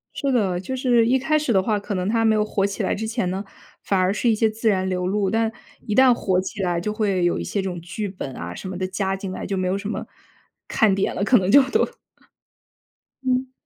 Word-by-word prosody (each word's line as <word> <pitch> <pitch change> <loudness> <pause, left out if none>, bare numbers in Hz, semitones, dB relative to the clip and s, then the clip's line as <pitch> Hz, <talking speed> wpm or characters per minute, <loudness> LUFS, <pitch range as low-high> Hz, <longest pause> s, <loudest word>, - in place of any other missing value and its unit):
是 280 -2 -1
的， 195 -8 +1
就 195 +8 -4
是 245 -3 +3
一 255 +3 +3
开 305 +4 +2
始 295 -6 0
的 190 - +4
话， 210 +1 0
可 205 - -5
能 185 -1 -1
它 225 0 +2
没 220 -1 +4
有 210 - +2
火 205 -2 0
起 200 0 -3
来 - - +1
之 220 +2 -4
前 220 -5 -1
呢， 190 +2 -3 0.4
反 195 -2 +1
而 185 +1 +2
是 235 +3 +1
一 - - +4
些 220 0 +2
自 225 +1 -3
然 190 -2 +1
流 180 -1 -1
露。 200 0 0
但 225 +2 +1 0.3
一 210 - -2
旦 260 +2 +6
火 190 -5 0
起 195 +1 -5
来 175 -2 0
就 210 - -2
会 200 -4 0
有 175 - +2
一 - - -3
些 200 - -2
这 190 - -3
种 175 -1 -5
剧 185 +5 -4
本 185 -9 -7
啊， 85 +1 -6
什 - - -7
么 185 -1 -5
的 185 0 -2
加 190 0 -1
进 195 -1 -6
来， - - -5
就 195 - -2
没 185 0 0
有 185 +2 0
什 200 +1 -6
么 - - -4 0.6
看 215 -3 +3
点 195 - 0
了， 195 - -2
可 250 +4 +5
能 185 0 +1
就 280 - +8
都 - - +2 1.4
嗯。 255 0 0
200 Hz, 280 characters per minute, -23 LUFS, 185-225 Hz, 1.4 s, 就